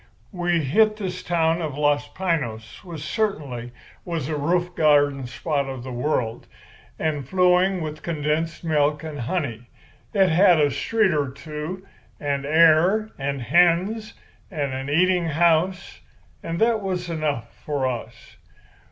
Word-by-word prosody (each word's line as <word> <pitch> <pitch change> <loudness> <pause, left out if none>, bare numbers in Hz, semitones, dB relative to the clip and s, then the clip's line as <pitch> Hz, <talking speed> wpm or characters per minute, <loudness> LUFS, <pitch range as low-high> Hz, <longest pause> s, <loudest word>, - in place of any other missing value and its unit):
We 175 -3 0
hit 215 +10 +3
this 185 -3 -4
town 165 -1 +1
of 150 -4 -4
Los 145 -1 +1
Piños, 135 -12 -3
which 170 -5 -8
certainly 140 - -2 0.3
was 165 -5 -3
a 155 - -1
roof 175 +4 0
garden 145 -4 +3
spot 140 +2 -2
of 130 -2 -6
the 130 - -7
world, 120 -3 -2 0.5
and 150 -4 -2
flowing 180 0 +3
with 155 -1 -5
condensed 160 0 -2
milk 150 -1 +1
and 155 -2 -6
honey. 120 -3 -3 0.4
It 195 -3 +3
had 175 0 +5
a 145 -1 +3
street 220 0 +1
or 145 -3 0
two, 155 +7 -7 0.3
and 140 -1 -2
air, 165 +7 +4
and 135 -1 -2
hens, 180 - +2 0.3
and 145 -7 -3
a 135 +2 -4
eating 180 +2 +3
house; 170 +3 +1 0.4
and 165 0 -4
that 225 -1 +2
was 185 -2 -3
enough 150 -8 -3
for 145 -3 -1
us. 120 -2 -6
155 Hz, 140 wpm, -23 LUFS, 140-180 Hz, 0.5 s, had